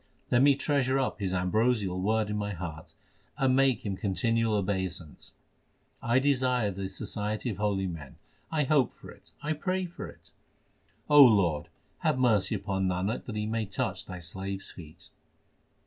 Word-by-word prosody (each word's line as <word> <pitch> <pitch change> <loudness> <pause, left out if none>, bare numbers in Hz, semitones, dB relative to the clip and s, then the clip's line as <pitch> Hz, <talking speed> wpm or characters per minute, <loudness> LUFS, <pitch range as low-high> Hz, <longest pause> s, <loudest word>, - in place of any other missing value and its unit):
Let 120 - +5
me 140 0 +6
treasure 135 -2 +1
up 135 -3 -1
his 95 -3 -1
ambrosial 95 +1 +1
word 110 +1 +1
in - - -1
my 105 -1 -2
heart, 80 -3 -7 0.4
and 130 -1 +3
make 135 -5 +2
him 100 -2 -1
continual 115 +3 0
obeisance. 95 -5 -3 0.7
I 120 +2 +2
desire 130 -5 +2
the 95 0 -5
society 105 +4 -3
of 100 - -6
holy 100 -2 0
men; 80 -6 -7 0.4
I 155 -2 +2
hope 140 -2 +2
for - - -12
it, - - -18
I 155 +1 0
pray 185 +4 -1
for 175 - -7
it. - - -17 0.8
Lord, 100 - +6 0.3
have - - +1
mercy 110 -7 +2
upon 95 -2 -1
Nanak 95 +4 -1
that 115 - -6
he 105 0 -1
may 110 -1 -2
touch 100 - -3
Thy 90 - -6
slaves 95 +3 -5
feet. 80 -3 -13
105 Hz, 160 wpm, -29 LUFS, 95-125 Hz, 0.8 s, me